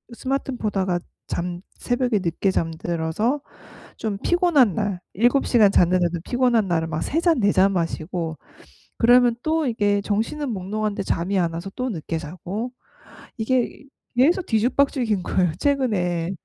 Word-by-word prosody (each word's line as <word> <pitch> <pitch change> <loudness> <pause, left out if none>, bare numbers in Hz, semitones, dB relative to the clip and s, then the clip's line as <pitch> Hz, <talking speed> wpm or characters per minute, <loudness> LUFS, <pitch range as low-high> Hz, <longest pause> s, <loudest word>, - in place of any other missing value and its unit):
스마트 270 +1 -2
보다가 190 -5 -1 0.3
잠 175 0 -3 0.2
새벽에 245 -3 0
늦게 185 +2 0
잠들어서 170 - -1 0.6
좀 210 -3 -3
피곤한 340 - +3
날 205 -2 -2
7 245 +6 +3
시간 215 -5 +5
잤는데도 175 -2 +2
피곤한 245 -5 +2
날은 165 -1 0
막 155 - -2
3 325 - 0
잔 330 -7 +2
4 205 - +3
잔 195 +1 +4
마시고 165 -1 -2 0.6
그러면 245 0 +5
또 315 -1 +1
이게 205 -4 +1
정신은 225 +8 -2
몽롱한데 210 +1 -2
잠이 190 +4 0
안 170 -2 +1
와서 175 +4 -5
또 255 0 -2
늦게 165 -3 -4
자고 185 +9 -5 0.7
이게 250 +4 -1 0.3
계속 330 +8 +3
뒤죽박죽인 235 -2 +1
거예요. 180 -3 +1
최근에. 190 - 0
205 Hz, 275 characters per minute, -23 LUFS, 175-250 Hz, 0.7 s, 시간